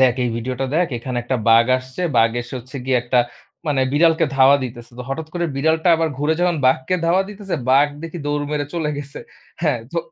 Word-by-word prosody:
"দেখ 130 -2 +5
এই 120 - +1
ভিডিওটা 125 +3 -3
দেখ 175 +1 +3
এখানে 125 +1 -5
একটা 130 +2 -1
বাঘ 115 +1 +6
আসছে।" 130 +4 -10 0.2
বাঘ 115 0 +5
এসে 120 - -8
হচ্ছে 130 +3 -10
গিয়ে 130 -1 +2
একটা 125 +1 +1 0.5
মানে 140 -3 +1
বিড়ালকে 165 +2 +4
ধাওয়া 135 +1 +6
দিতেছে। 120 0 -8
তো - - -4
হঠাৎ 155 +3 -4
করে 175 -1 -1
বিড়ালটা 160 +4 +1
আবার 165 0 0
ঘুরে 150 +3 +1
যখন 175 -1 +2
বাঘকে 130 +6 +2
ধাওয়া 180 +3 +3
দিতেছে 200 -2 -5 0.2
বাঘ 140 +2 +5
দেখি 165 +1 -6
দৌড় 145 0 -1
মেরে 145 -1 -1
চলে 160 -3 -1
গেছে। 140 -1 -8 0.4
হ্যাঁ 150 -7 +1
তো 170 - 0
140 Hz, 210 wpm, -20 LUFS, 130-160 Hz, 0.5 s, বাঘ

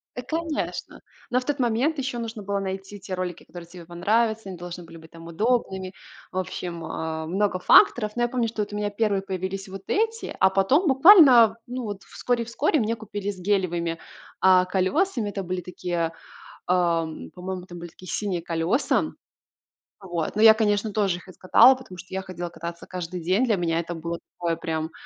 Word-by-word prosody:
Э, 250 - -4
конечно. 320 +3 -4 0.3
Но 250 - +2
в 255 - -9
тот 290 -1 -2
момент 250 +6 +1
еще 265 -2 -3
нужно 225 -2 -6
было 200 0 -1
найти 195 +1 -5
те 190 0 -7
ролики, 180 -1 -4
которые 175 -1 -11
тебе 170 0 -12
понравятся, 215 +5 0
они 185 - -7
должны 175 0 -8
были 165 0 -13
быть 160 0 -15
там 165 0 -12
удобными. 190 -1 -1 0.4
В 185 - -6
общем, 175 -2 -4
э, 160 0 -4
много 190 +2 0
факторов. 215 +3 +5
Но 240 - 0
я - - +3
помню, 240 -1 -1
что 220 -1 -3
вот 205 0 -4
у - - -3
меня 210 0 -1
первые 205 -1 0
появились 190 0 -4
вот 195 0 -9
эти, 450 +2 -1
а 190 - +6
потом 200 - +2
буквально, 265 - +8
ну, 250 +1 -4
вот 205 -3 -6
вскоре-вскоре 245 +5 -1
мне 225 0 0
купили 205 -2 -5
с 190 - -12
гелевыми, 175 -4 0 0.4
а, 185 -1 +6
колесами. 210 - 0
Это 200 -1 -4
были 180 0 -3
такие, 175 -1 -3 0.6
э, - - +3
м, 165 -3 -1
по-моему, 185 0 -6
там 175 -1 -10
были 170 0 -8
такие 185 +2 -11
синие 190 -5 -2
колеса. 165 - +1 0.9
Вот. 175 -4 -4
Но 215 - +2
я, 220 -1 +10
конечно, 210 -1 0
тоже 195 -4 +1
их 180 - -15
искатала, 185 +7 +6
потому 255 -8 -11
что 185 +1 -11
я 190 - -2
ходила 180 -2 -6
кататься 170 +1 -8
каждый 180 -1 -5
день. 185 +9 +1
Для 225 -4 +2
меня 165 -3 0
это 170 +1 -4
было 170 +1 -5 0.2
такое 170 -1 -1
прям, 160 0 -3
190 Hz, 190 wpm, -25 LUFS, 175-225 Hz, 0.9 s, я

